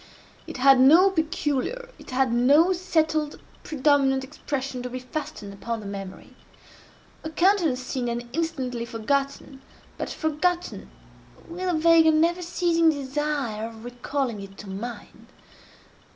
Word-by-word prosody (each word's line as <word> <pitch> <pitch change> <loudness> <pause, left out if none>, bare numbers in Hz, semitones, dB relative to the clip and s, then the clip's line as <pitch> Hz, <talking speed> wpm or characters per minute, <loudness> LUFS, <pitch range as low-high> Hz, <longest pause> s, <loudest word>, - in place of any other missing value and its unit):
It - - -7
had 270 0 +6
no 330 +9 +7
peculiar, 320 - -2
it - - -13
had 255 -1 +1
no 290 +9 +5
settled 315 -4 0 0.2
predominant 275 -2 +2
expression 265 -1 -4
to 250 - -5
be 255 - -5
fastened 250 -6 -6
upon 230 +3 -4
the 210 - -10
memory; 195 -1 -8 0.9
a 315 - -4
countenance 340 -6 +2
seen 255 -1 -3
and 240 0 -3
instantly 265 -8 -2
forgotten, 270 +4 -2 0.4
but - - -3
forgotten 345 +3 -2 0.6
with 360 +2 -4
a 345 - +1
vague 330 0 +5
and 310 -1 +4
never 345 +2 +2
ceasing 340 -1 +2
desire 280 -6 -2
of 225 0 -12
recalling 245 -2 -3
it 195 0 -11
to 200 - -10
mind. 210 +2 -8
275 Hz, 135 wpm, -25 LUFS, 245-325 Hz, 0.9 s, no